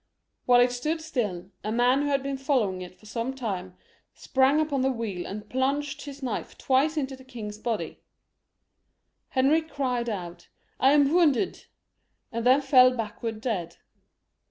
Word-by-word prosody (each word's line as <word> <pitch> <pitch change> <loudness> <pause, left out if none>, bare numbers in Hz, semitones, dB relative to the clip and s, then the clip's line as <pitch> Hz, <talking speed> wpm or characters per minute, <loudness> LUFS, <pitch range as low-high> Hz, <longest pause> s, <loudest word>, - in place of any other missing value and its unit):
While 245 -1 +7
it 245 0 +4
stood 305 +7 -2
still, 210 - -3
a 215 - -2
man 245 +4 +3
who 290 - 0
had 275 -1 +1
been 275 0 -2
follow 265 -8 +1
ing 185 - -7
it 180 0 -9
for - - -19
some 235 +4 -3
way, 195 -8 -4 0.5
sprang 270 +2 +2
up 310 -1 -1
on 275 - +1
the 265 - +2
wheel 220 -7 -4
and 210 +2 -7
plunged 275 +4 -1
his 285 -1 -9
knife 245 -5 -4
twice 280 +4 +2
into 270 -2 -2
the 260 - -15
king's 220 -5 -8
body. 215 -7 -3 1.3
Henry 280 +5 +3
cried 255 -6 -2
out, 180 -5 -6 0.2
" - - -41
I 270 +2 +5
am 290 0 +4
wounded 340 -1 +2 0.3
;" - - -49
and 230 0 -3
then 260 +4 +5
fell 255 -2 +5
backward 225 0 -4
dead. 180 -9 -3
255 Hz, 175 wpm, -27 LUFS, 220-275 Hz, 1.3 s, While